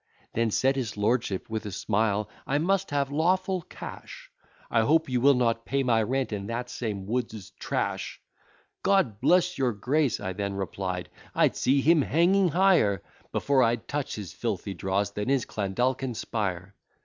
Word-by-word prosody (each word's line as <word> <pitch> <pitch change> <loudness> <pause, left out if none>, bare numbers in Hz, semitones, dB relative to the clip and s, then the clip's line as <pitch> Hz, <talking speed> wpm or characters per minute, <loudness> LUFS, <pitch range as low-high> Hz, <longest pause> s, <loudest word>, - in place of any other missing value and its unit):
Then 115 0 +1
said 135 +5 +2
his 110 -5 -3
lordship 105 -2 0
with 110 -1 -3
a - - -5
smile, 105 +1 0 0.2
"I 140 - +1
must 185 +5 +1
have 140 -1 0
lawful 185 +4 +1
cash, - - -10 0.4
I 115 - +4
hope 160 +7 +3
you 125 -2 0
will 140 +1 +6
not 115 -2 +1
pay 135 +3 0
my 115 -3 +3
rent 130 +2 -1
in 100 -1 -4
that 120 +1 -4
same 105 -6 -4
Wood's 110 -2 -3
trash!" - - -2 0.6
"God 130 - +2
bless 180 -2 +3
your 125 -3 +2
Grace," 135 +5 +1
I 95 - -4
then 100 0 -3
replied, 95 -1 -3 0.3
"I'd - - +3
see 135 +2 +2
him 160 +2 +5
hanging 175 +7 +3
higher, 170 - +3 0.3
Before 140 -2 +2
I'd 115 -1 +1
touch 145 -1 -3
his 100 -7 -7
filthy 105 -4 -3
dross, 95 +3 -1
than 105 +4 -3
is 135 -4 +2
Clandalkin 125 +5 -1
spire." 100 -4 -3
120 Hz, 165 wpm, -27 LUFS, 105-140 Hz, 0.6 s, will